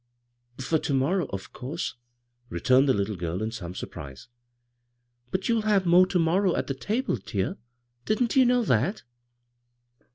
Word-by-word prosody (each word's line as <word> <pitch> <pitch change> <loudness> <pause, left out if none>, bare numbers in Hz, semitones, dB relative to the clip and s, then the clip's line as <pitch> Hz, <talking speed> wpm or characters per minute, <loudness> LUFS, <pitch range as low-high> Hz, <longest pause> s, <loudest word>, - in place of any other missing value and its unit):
" 120 0 -40
For 160 - +2
ter 140 - -1
morrow, 160 +5 +1
of 95 -1 -7
couise," 140 +7 -4 0.6
returned 130 +10 +3
the - - +5
little 100 +1 -1
girl 85 0 -3
in 110 - -2
some 90 -6 -7
surprise. 70 - -8 0.5
" 120 0 -46
But 185 - -1
you'U 230 -1 +2
have 210 -3 +2
more 175 +2 +6
to 185 - 0
morrow 175 +3 +2
at - - -1
the 135 - -2
table, 215 - -1
dear. 100 -1 -3 0.5
Didn't 230 +4 +1
you 265 - +7
know 245 -1 +3
that?" 155 - +1
135 Hz, 165 wpm, -26 LUFS, 115-190 Hz, 0.6 s, you